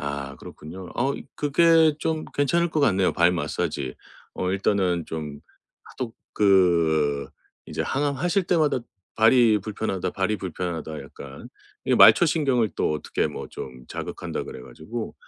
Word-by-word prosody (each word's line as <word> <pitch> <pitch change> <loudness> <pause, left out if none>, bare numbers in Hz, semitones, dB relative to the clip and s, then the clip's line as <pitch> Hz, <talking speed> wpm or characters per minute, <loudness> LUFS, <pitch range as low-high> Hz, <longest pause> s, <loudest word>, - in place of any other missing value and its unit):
아 70 -1 -5
그렇군요. 90 +4 -10
어 135 +3 0 0.2
그게 160 +1 +4
좀 160 0 -2
괜찮을 170 +5 +1
것 155 - 0
같네요. 95 -8 +3
발 85 +1 +3
마사지. 70 -6 -3 0.4
어 90 - -2
일단은 95 -3 +1
좀 75 -3 -6 0.4
하독 120 -3 -7 0.2
그 85 -8 +3 0.4
이제 - - -3
항암하실 145 +7 0
때마다 155 -6 +2 0.4
"발이 115 -1 +5
불편하다, 100 -2 -3
발이 95 +3 -1
불편하다 85 -4 -5
약간." 70 -1 -11 0.4
이 - - +2
말초신경을 140 - +5
또 - - +1
어떻게 75 - -1
뭐 - - -7
좀 65 -1 -9
자극한다 - - -5
그래 - - -9
가지고 105 - -7
95 Hz, 285 characters per minute, -24 LUFS, -, 0.4 s, 발이